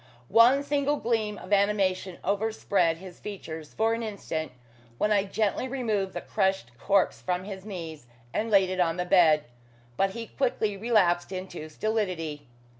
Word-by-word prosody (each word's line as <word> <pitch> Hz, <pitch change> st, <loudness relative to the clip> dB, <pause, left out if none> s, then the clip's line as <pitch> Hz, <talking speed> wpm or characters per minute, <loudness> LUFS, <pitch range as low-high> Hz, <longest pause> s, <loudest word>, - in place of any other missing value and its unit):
One 240 Hz, +6 st, +6 dB
single 285 Hz, 0 st, +1 dB
gleam 225 Hz, -5 st, -1 dB
of 185 Hz, -, -4 dB
animation 195 Hz, -2 st, +1 dB
overspread 200 Hz, -4 st, +1 dB
his 185 Hz, 0 st, -11 dB
features 160 Hz, -7 st, -8 dB
for 225 Hz, +1 st, +2 dB
an 230 Hz, -, -2 dB
instant 200 Hz, -7 st, -4 dB, 0.5 s
when 210 Hz, -, +1 dB
I 200 Hz, -1 st, +3 dB
gently 215 Hz, +5 st, -1 dB
removed 220 Hz, -7 st, -1 dB
the -, -, -4 dB
crushed 190 Hz, -11 st, -1 dB
corpse 195 Hz, +5 st, +2 dB
from 180 Hz, 0 st, -1 dB
his 195 Hz, -1 st, -8 dB
knees, 165 Hz, -, -7 dB, 0.3 s
and 225 Hz, +2 st, -1 dB
laid 195 Hz, -3 st, +4 dB
it 185 Hz, -, -3 dB
on 170 Hz, -1 st, +2 dB
the 180 Hz, -, -1 dB
bed, 165 Hz, -5 st, +5 dB, 0.5 s
but 195 Hz, -, +3 dB
he 230 Hz, -, -4 dB
quickly 225 Hz, -5 st, -1 dB
relapsed 195 Hz, -5 st, +2 dB
into 185 Hz, -4 st, -6 dB
stolidity. 165 Hz, -, -2 dB
195 Hz, 155 wpm, -27 LUFS, 175-220 Hz, 0.5 s, One